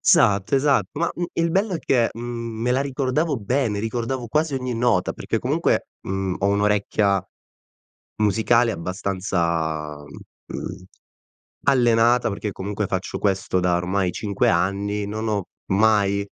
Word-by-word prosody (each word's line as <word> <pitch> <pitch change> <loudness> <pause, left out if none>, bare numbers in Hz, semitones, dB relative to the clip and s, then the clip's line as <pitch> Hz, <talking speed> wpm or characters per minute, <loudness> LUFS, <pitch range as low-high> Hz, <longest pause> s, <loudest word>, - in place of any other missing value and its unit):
Esatto, 100 +5 +4
esatto. 140 +1 +3
Ma, 170 - +1
mhmm, 175 - -2
il 170 0 +1
bello 195 +2 +1
è - - -1
che, 120 -6 +2
mhmm, 115 -1 -5
me 125 - +1
la 130 +2 +2
ricordavo 140 +2 0
bene, 115 0 0
ricordavo 120 +3 -2
quasi 150 +3 +1
ogni 125 -2 -2
nota, 115 -6 +1
perché - - -2
comunque, - - 0
mhmm, 95 -1 -2
ho 100 - +1
un'orecchia 100 -1 +2 0.9
musicale 115 +3 +3
abbastanza, 85 -5 -2
mhmm, 90 +5 -9 0.8
allenata, 120 -3 +4
perché 105 +1 -4
comunque 100 +1 -3
faccio 95 0 -3
questo 95 -2 0
da 90 -1 +2
ormai 90 +1 0
5 100 0 0
anni, 100 +4 0
non 110 +2 -4
ho 100 -3 -1 0.3
mai 100 -1 +3
105 Hz, 135 wpm, -23 LUFS, 95-120 Hz, 0.9 s, Esatto